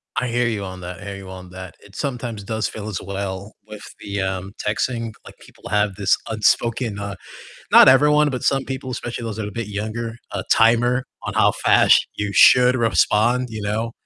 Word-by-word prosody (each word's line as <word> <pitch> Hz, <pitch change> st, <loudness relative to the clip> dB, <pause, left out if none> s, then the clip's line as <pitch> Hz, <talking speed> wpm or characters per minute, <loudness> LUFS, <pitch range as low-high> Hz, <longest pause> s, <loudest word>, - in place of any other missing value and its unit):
I 125 Hz, -, -1 dB
hear 120 Hz, 0 st, 0 dB
you 110 Hz, -4 st, -2 dB
on 95 Hz, -1 st, -8 dB
that, 90 Hz, +1 st, -8 dB
I 105 Hz, -, -11 dB
hear 100 Hz, -1 st, -6 dB
you 95 Hz, -1 st, -11 dB
on 90 Hz, -1 st, -10 dB
that, 95 Hz, -1 st, -10 dB
it 100 Hz, 0 st, -18 dB
sometimes 120 Hz, -7 st, -4 dB
does 110 Hz, +1 st, -2 dB
feel 110 Hz, -1 st, -8 dB
as 100 Hz, -5 st, -4 dB
well 100 Hz, +1 st, -5 dB
with 105 Hz, -1 st, -10 dB, 0.2 s
the, 100 Hz, -1 st, -4 dB
um, 95 Hz, +1 st, -4 dB
texting, 115 Hz, +1 st, -2 dB
like, -, -, -13 dB
people -, -, -14 dB
have 105 Hz, -2 st, +1 dB
this 100 Hz, -2 st, +2 dB
unspoken, 110 Hz, +1 st, 0 dB
uh 100 Hz, -2 st, -5 dB, 0.6 s
not -, -, +9 dB
everyone, 150 Hz, +2 st, +4 dB
but 125 Hz, -2 st, -4 dB
some 135 Hz, -1 st, +1 dB
people, 130 Hz, -1 st, -6 dB
especially 120 Hz, -1 st, -5 dB
those 110 Hz, -3 st, -4 dB
that 110 Hz, -, -3 dB
are -, -, -5 dB
a -, -, -12 dB
bit 115 Hz, -1 st, -5 dB
younger, 110 Hz, +3 st, -5 dB
a -, -, -4 dB
timer 120 Hz, +2 st, +3 dB, 0.2 s
on -, -, -4 dB
how -, -, +4 dB
fast -, -, +5 dB
you 105 Hz, -1 st, -3 dB
should 125 Hz, +6 st, +6 dB
respond, 120 Hz, +1 st, +2 dB
you 110 Hz, -1 st, -6 dB
know, 110 Hz, +3 st, -2 dB
110 Hz, 205 wpm, -21 LUFS, 100-120 Hz, 0.6 s, not